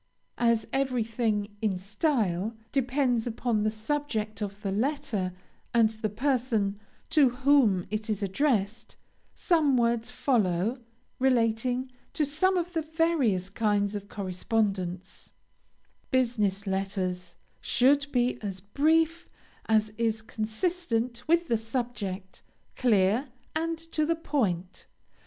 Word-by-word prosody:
As 235 -2 +3
everything, 230 -5 0
in 205 -4 +1
style, 210 - 0 0.2
depends 255 -3 +1
upon 230 -1 0
the 215 - +2
subject 220 -2 -3
of 205 +1 -5
the 195 - -1
letter, 235 -4 -1 0.4
and 225 -2 +5
the 220 -1 -3
person 225 -4 0 0.3
to 295 -5 +5
whom 250 -7 +3
it 215 +1 -3
is 210 -1 -1
addressed, 205 0 0 0.4
some 305 -7 +3
words 235 0 +1
follow, 225 -3 +1 0.4
relating 250 0 +1 0.2
to 300 - +1
some 365 +7 +2
of 355 0 -2
the 325 - 0
various 305 - +1
kinds 205 -1 +1
of 200 -1 -6
correspondence: 190 -1 -2 0.8
BUSINESS 215 -6 +1
LETTERS 190 -2 -2 0.2
should 285 +3 +3
be 245 -1 +1
as 195 -3 -4
brief 320 - +1 0.4
as 215 -1 +2
is 225 -1 0
consistent 235 +1 -2
with 340 +1 +3
the 230 -2 +1
subject; 220 -5 -4 0.3
clear, 220 +2 +3 0.3
and 330 +1 -1
to 310 -1 +1
the 335 - +2
point. 195 - -2
230 Hz, 115 wpm, -28 LUFS, 205-270 Hz, 0.8 s, and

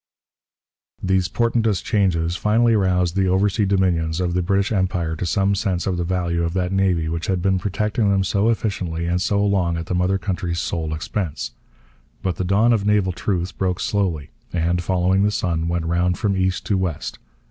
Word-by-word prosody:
These 95 -1 +2
portentous 115 -2 +1
changes 85 -5 0
finally 115 +4 +3
roused 90 -3 +1
the 95 -1 +2
oversea 100 +2 +2
dominions 90 -4 +1
of 90 -1 0
the 90 - +1
British 100 +4 +1
Empire 90 -5 0
to 85 +2 -3
some 100 +2 +2
sense 95 -3 -1
of 95 -3 -1
the 85 - -1
value 85 -1 -1
of 85 +1 -2
that 90 -1 0
navy 95 -4 +1
which 85 +1 -3
had 95 -2 0
been 95 +1 +1
protecting 105 +2 0
them 95 -1 +2
so 100 +3 +1
efficiently 95 -7 -2
and 90 +1 0
so 100 +2 +1
long 90 -4 +1
at 85 - -4
the 90 - -3
mother 90 +2 +1
country's 90 -3 -3
sole 80 -2 -2
expense. 75 - -4 0.7
But 90 -4 -1
the - - -1
dawn 105 +6 +3
of 110 -3 +1
naval 105 -2 +2
truth 90 0 -2
broke 90 -2 0
slowly 90 -8 -1 0.2
and, 85 +1 0
following 95 +1 +1
the 105 - +3
sun, 90 -7 -1
went 85 -1 -1
round 90 +2 +1
from 105 -4 0
east 95 -1 0
to 100 -3 +1
west. 90 -5 -3
95 Hz, 190 wpm, -21 LUFS, 85-100 Hz, 0.7 s, finally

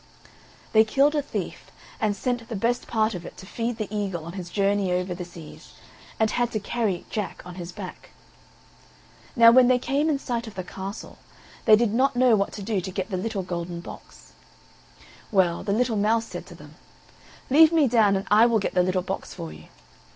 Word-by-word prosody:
They 220 0 +7
killed 275 +6 +3
a 295 - +1
thief, 285 - -6 0.3
and 210 -2 0
sent 245 0 -3
the 230 - -4
best 235 +4 -1
part 220 -1 +1
of 175 -2 -6
it - - -10
to - - -11
feed 230 +3 -3
the 215 - -3
eagle 190 -6 -3
on 170 - -7
his 185 -3 -7
journey 200 -1 +1
over 180 0 -1
the 180 +1 -6
seas, 175 -3 -12 0.5
and 220 -1 +2
had 240 -1 0
to 215 - 0
carry 205 -3 -2
Jack 210 -3 -4
on 180 - -8
his 175 -1 -7
back. - - -9 1.3
Now 230 -2 +8
when 250 +1 +6
they 255 0 +4
came 280 +5 0
in 295 - +2
sight 240 -3 -4
of 215 - -10
the 185 - -4
castle, 195 +3 -8 0.5
they 215 - +8
did 220 -1 +1
not 260 +3 +2
know 245 -2 +5
what 200 -1 0
to 205 - -7
do 205 -2 -1
to 190 - -5
get 190 +2 -4
the - - -1
little 195 +1 -3
golden 170 -1 -5
box. 170 - -12 1.0
Well, 180 -4 +2
the 200 - -3
little 230 +1 +1
mouse 225 +2 +2
said - - -8
to - - -11
them: - - -15 0.7
"Leave 315 +3 +7
me 320 -4 +4
down, 220 -4 +4
and 195 - -2
I 220 +3 +7
will 230 -2 +3
get 200 - -2
the 180 - +3
little 185 0 0
box 190 +1 -5
for 80 -2 -7
you." 75 0 -13
210 Hz, 210 wpm, -25 LUFS, 185-235 Hz, 1.3 s, Now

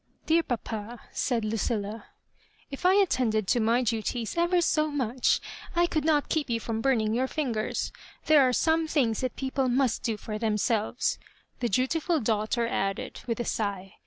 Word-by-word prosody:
sl) 320 - +1
'^Dear 330 0 +3
papa," 225 -1 -4
said 235 -4 -1
Lucilla, 215 0 -2 0.3
*' - - -34
if 280 +6 0
I 375 - +5
attended 245 - +2
to 245 - +3
my 230 +3 +2
duties 225 0 -2
ever 345 +1 +3
so 310 -2 +2
much 260 -4 +1 0.4
I 345 0 +4
could 315 -4 -1
not 300 -2 +3
keep 305 -4 -1
you 230 -1 0
from 225 0 -3
burning 225 -4 +2
your 255 +3 +1
fingera 245 -8 -2 0.3
There 310 -2 +6
are 255 -1 +4
some 320 +5 +2
things 250 -8 +1
that 255 -1 -2
people 265 -1 -1
must 250 -1 +1
do 225 -2 -1
for 215 0 -5
themselyes,'' 220 +1 0 0.4
the 240 - 0
dutiful 310 - +1
daughter 220 0 0
added, 195 -5 -2
with 230 0 -2
a 240 - -1
sigh. 200 -2 -3
240 Hz, 175 wpm, -27 LUFS, 220-290 Hz, 0.4 s, There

